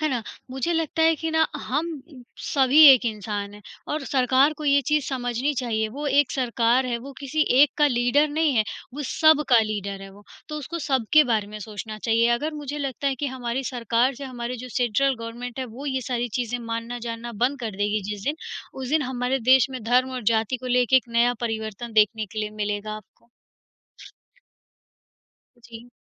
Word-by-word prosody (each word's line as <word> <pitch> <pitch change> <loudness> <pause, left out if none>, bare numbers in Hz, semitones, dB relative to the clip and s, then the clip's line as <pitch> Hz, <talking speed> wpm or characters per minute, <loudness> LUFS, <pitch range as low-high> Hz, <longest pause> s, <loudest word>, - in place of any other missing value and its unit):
है 310 - +1
ना? 250 -5 -2 0.3
मुझे 265 +6 -2
लगता 325 -1 0
है 325 0 +5
कि 320 +1 -3
ना 320 0 +3 0.2
हम 305 +6 -1 0.5
सभी 275 +2 +5
एक 255 -1 +2
इंसान 205 -1 -4
हैं 210 - -14 0.3
और 300 -2 -3
सरकार 265 +2 +3
को 305 - -6
ये 280 -1 +4
चीज़ 300 -2 +1
समझनी 250 +1 -1
चाहिए, 220 -3 -1
वो 285 +6 -6
एक 280 -1 +3
सरकार 245 0 +1
है 240 -1 -2
वो 275 +3 -10
किसी 280 +3 -2 0.2
एक 290 - +6
का 295 - +5
लीडर 250 +4 +2
नहीं 305 -1 +1
है, 220 - +3 0.3
वो 295 - -4
सब 315 -2 +4
का 245 - +6
लीडर 200 -2 -4
है 195 - -10
वो। 205 - -16 0.3
तो 300 - -5
उसको 310 +4 -6
सबके 290 0 +3
बारे 220 -4 0
में 210 +1 -8
सोचना 215 +1 -7
चाहिए। 230 +1 +2
अगर 305 +6 -3
मुझे 295 0 -5
लगता 275 -1 -3
है 275 - +1
कि 290 - 0
हमारी 255 0 -3
सरकार 240 +1 0
से 275 +3 -8
हमारी 250 -1 -5
जो 250 +2 -8
सेंट्रल 255 +3 +2
गवर्नमेंट 235 +2 -7
है, 260 - -2
वो 255 +4 -9
ये 265 -1 -1
सारी 245 -1 -1
चीज़ें 245 0 -2
मानना 230 +1 -4
जानना 230 +1 -6
बंद 275 +2 0
कर 230 - -3
देगी 205 +1 0
जिस 205 -1 -5
दिन, 295 +2 -1 0.4
उस 260 -1 -6
दिन 310 +2 +2
हमारे 255 0 -1
देश 265 -1 +7
में 255 -3 -6
धर्म 250 +3 +2
और 250 - -4
जाति 225 +3 0
को 255 - -9
लेके 250 +1 +3
एक 255 - +1
नया 245 +1 +3
परिवर्तन 225 0 -4
देखने 215 0 +2
के 215 +3 -8
लिए 210 0 -3
मिलेगा 210 0 -3
आपको। 215 +2 -17 2.3
जी। 235 0 -13
250 Hz, 200 wpm, -24 LUFS, 230-280 Hz, 2.3 s, देश